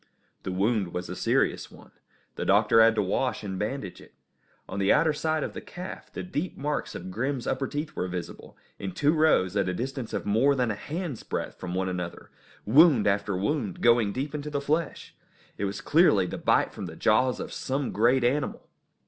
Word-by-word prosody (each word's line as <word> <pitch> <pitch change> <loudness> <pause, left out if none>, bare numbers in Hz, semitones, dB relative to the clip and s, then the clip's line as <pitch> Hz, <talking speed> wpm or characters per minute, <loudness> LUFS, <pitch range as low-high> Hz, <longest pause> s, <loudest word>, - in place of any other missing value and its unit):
The 95 - -4
wound 100 -1 0
was 90 0 -4
a - - -4
serious - - 0
one. - - -16 0.4
The - - -4
doctor 115 - +5
had 115 0 +6
to 105 - +2
wash 120 +6 -1
and 95 -2 -4
bandage 105 -3 -4
it. - - -18 0.5
On 95 - -5
the 100 0 +3
outer 155 -1 +4
side 155 0 -1
of - - -4
the - - -6
calf, 180 +1 -9
the - - -6
deep 180 -1 -4
marks 145 +1 -3
of 95 +1 -7
Grim's 130 +4 -2
upper 135 0 -1
teeth 150 +3 -5
were 90 - -2
visible, 90 -1 -7 0.2
in 95 -2 -5
two 150 - +2
rows 155 - +3
at 100 -2 +1
a 90 - -2
distance 130 +1 -4
of - - -3
more 115 +8 +3
than 125 -3 +1
a - - -1
hand's 150 - -5
breadth - - -5
from 90 -1 -5
one 95 0 0
another, 90 -2 -5 0.3
wound 140 0 +6
after 100 -1 +1
wound, 105 - -2
going 115 -3 +4
deep 135 +6 -4
into 150 0 -4
the 145 -1 -1
flesh. 150 +2 -2 0.5
It 100 - 0
was 100 0 -4
clearly 145 - +4
the - - -5
bite - - +2
from 95 - -6
the 80 - -9
jaws 125 +7 +2
of - - -6
some 135 0 -2
great 120 +4 +3
animal. 135 +4 -1
120 Hz, 205 wpm, -27 LUFS, 100-145 Hz, 0.5 s, had